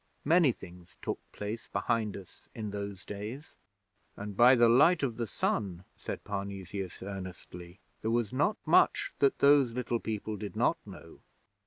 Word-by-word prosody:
Many 160 -2 +5
things 90 -5 -13
took - - -2
place 105 +2 -5
behind 115 -4 -1
us 95 -2 -14
in 105 -2 -4
those 100 -1 -6
days. 105 +9 -7 0.6
And 100 0 -6
by 120 +4 +7
the 120 -1 +5
Light 145 +8 +5
of 120 -5 -1
the 115 -2 -2
Sun,' 95 -3 -2
said - - -6
Parnesius, 100 -2 -5
earnestly, 95 -2 -8 0.2
'there 110 - -1
was 115 -2 0
not 150 +11 +1
much - - +3
that 410 -1 +3
those 140 -4 +5
little 120 -1 -1
people 110 -1 -4
did 100 0 -6
not - - +2
know! - - -12
105 Hz, 155 wpm, -30 LUFS, 100-125 Hz, 0.6 s, by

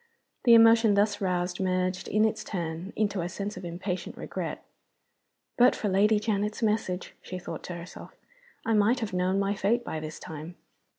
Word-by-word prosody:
The 235 -1 +8
emotion 225 -2 +6
thus 205 +1 +2
roused 180 -1 -1
merged, 185 -1 -1
in 215 +1 +3
its 220 - -1
turn, 170 0 -4
into 205 -3 0
a 170 - -3
sense 200 +3 -5
of 185 - -8
impatient 180 +2 -4
regret. - - -5 1.0
"But 250 +1 +6
for 210 - -2
Lady 210 +3 +4
Janet's 210 +1 -1
message," 210 -4 -1
she 185 - -6
thought 180 - -7
to 175 - -5
herself, 170 +1 -10 0.5
"I 225 - +1
might 215 +4 +3
have 215 -4 -3
known 180 +1 +1
my 200 0 +1
fate 215 +4 0
by 160 - -3
this 155 0 -7
time!" 160 +2 -8
195 Hz, 175 wpm, -28 LUFS, 180-215 Hz, 1.0 s, The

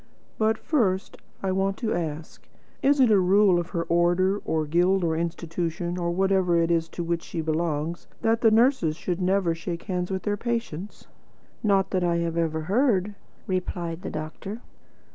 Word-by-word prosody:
"But 220 0 +2
first 220 - 0 0.3
I 190 - 0
want 195 +1 0
to 225 -3 -1
ask, 160 -2 -5 0.3
Is 285 +1 +3
it 250 -4 +5
a 205 - +6
rule 190 0 +4
of 175 - -4
her 170 - -2
order, 175 +4 +2
or 155 -1 0
guild, 175 +4 +2
or 160 -1 +1
institution, 170 +1 -3
or 170 -1 -1
whatever 190 -1 +2
it 165 0 +1
is 165 -1 +1
to 175 - -5
which 170 0 -1
she 170 - -6
belongs, 160 0 -2 0.2
that 225 +1 +2
the 225 - +6
nurses 225 - +3
should 175 +1 -3
never 185 -2 +2
shake 170 +1 -5
hands 180 -3 -2
with 190 -2 -3
their 205 0 -1
patients?" 230 -6 -4 0.6
"Not 195 -3 +2
that 185 -2 +1
I 170 -1 +2
have 170 -1 -1
ever 160 -1 0
heard," 205 - +1 0.3
replied 175 -2 -3
the - - -5
doctor. 160 +8 -6
180 Hz, 175 wpm, -25 LUFS, 170-200 Hz, 0.6 s, a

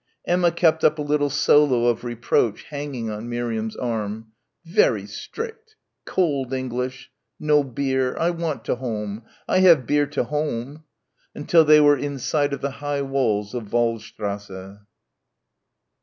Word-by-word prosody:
Emma 175 -1 +2
kept 160 -2 +2
up 155 - +4
a - - -3
little 145 0 +1
solo 135 -5 +3
of 120 -1 +1
reproach 120 -2 0
hanging 140 -6 -5
on 105 +3 -6
Miriam's 115 -2 -3
arm. 110 -2 -4 0.3
"Very 320 - +2
strict. 450 -1 -8 0.3
Cold 140 -8 0
English. 130 0 -4 0.3
No 150 -1 +3
bier. 130 -1 -1
I 170 +1 +1
want 165 -3 -4
to - - -1
home. 110 -4 -4 0.3
I - - +2
have 170 -9 +6
bier 145 +2 +2
to 145 -2 -1
home" 150 +1 -4 0.5
until 160 +3 +4
they 150 0 +7
were 145 -1 +5
in 145 0 -3
sight 145 +2 0
of 140 - -4
the 140 - -2
high 145 -1 -1
walls 115 -7 -1
of 115 -5 -6
Waldstrasse. 105 -4 -3
135 Hz, 140 wpm, -23 LUFS, 115-150 Hz, 0.5 s, they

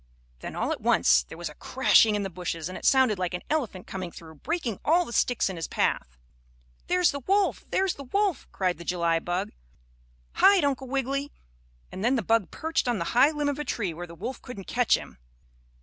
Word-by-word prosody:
Then, - - -7
all - - -1
at - - -3
once 65 - +4
there - - -9
was 175 0 -4
a - - -8
crashing 225 - +3
in 205 - -1
the 195 - -3
bushes 170 -2 -4
and 185 - -7
it - - -7
sounded 260 -7 +4
like 180 -1 -1
an 180 - -6
elephant 240 -12 -2
coming 185 -2 -6
through, 160 -1 -12
breaking 245 - -3
all 345 +3 +3
the 235 - -8
sticks 245 0 +2
in 190 -2 -5
his 165 - -4
path. - - -1 0.7
"There's 360 -1 +3
the 280 - -5
wolf! 390 +8 +1
There's 380 -1 +1
the 280 - -10
wolf!" 395 +2 0
cried 180 -3 -1
the - - -7
July 170 -1 +1
bug. 175 +2 -3 0.8
"Hide, 395 -4 +5
Uncle 270 -2 -1
Wiggily," 275 +2 -2 0.6
and 190 - -6
then 245 +4 +3
the 235 - -1
bug 225 0 +2
perched 320 -4 -2
on 240 -2 +1
the 170 - -3
high 265 +4 +6
limb 295 -2 -2
of 285 0 -1
a - - -1
tree 200 - -2
where 175 +2 -7
the 170 - -11
wolf 255 +10 -6
couldn't 205 -7 -9
catch 245 -1 +2
him. - - -11
235 Hz, 215 wpm, -27 LUFS, 180-285 Hz, 0.8 s, high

